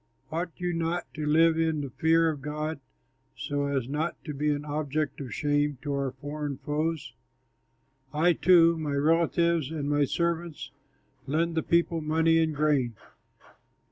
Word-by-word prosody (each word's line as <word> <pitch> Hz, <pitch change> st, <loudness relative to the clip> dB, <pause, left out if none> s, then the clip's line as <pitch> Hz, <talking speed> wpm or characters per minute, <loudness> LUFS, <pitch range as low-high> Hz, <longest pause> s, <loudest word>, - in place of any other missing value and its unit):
Ought 170 Hz, +3 st, -2 dB
you 180 Hz, -1 st, -1 dB
not 165 Hz, +1 st, -1 dB
to 150 Hz, -1 st, -4 dB
live 160 Hz, +2 st, +4 dB
in 160 Hz, -2 st, +1 dB
the 140 Hz, -2 st, -6 dB
fear 165 Hz, +5 st, +3 dB
of 145 Hz, -3 st, -7 dB
God, 150 Hz, +2 st, -4 dB, 0.6 s
so 145 Hz, 0 st, -2 dB
as 135 Hz, -4 st, -1 dB
not 150 Hz, +5 st, -2 dB
to 150 Hz, -, -4 dB
be 150 Hz, +2 st, 0 dB
an 145 Hz, 0 st, -1 dB
object 150 Hz, -1 st, -2 dB
of 130 Hz, -4 st, -6 dB
shame 145 Hz, +3 st, 0 dB
to 145 Hz, -1 st, -2 dB
our 140 Hz, -1 st, -1 dB
foreign 145 Hz, +1 st, -5 dB
foes? 150 Hz, -4 st, -2 dB, 1.0 s
I, 165 Hz, +4 st, +3 dB
too, 170 Hz, -1 st, +5 dB
my 150 Hz, -2 st, -2 dB
relatives, 165 Hz, 0 st, +2 dB
and 155 Hz, -3 st, -3 dB
my 145 Hz, 0 st, +2 dB
servants 170 Hz, +1 st, -2 dB, 0.6 s
lend 165 Hz, +4 st, 0 dB
the 160 Hz, -, +1 dB
people 170 Hz, 0 st, +1 dB
money 160 Hz, +1 st, +3 dB
and 160 Hz, -2 st, +1 dB
grain. 140 Hz, -6 st, +1 dB
155 Hz, 155 wpm, -28 LUFS, 145-165 Hz, 1.0 s, too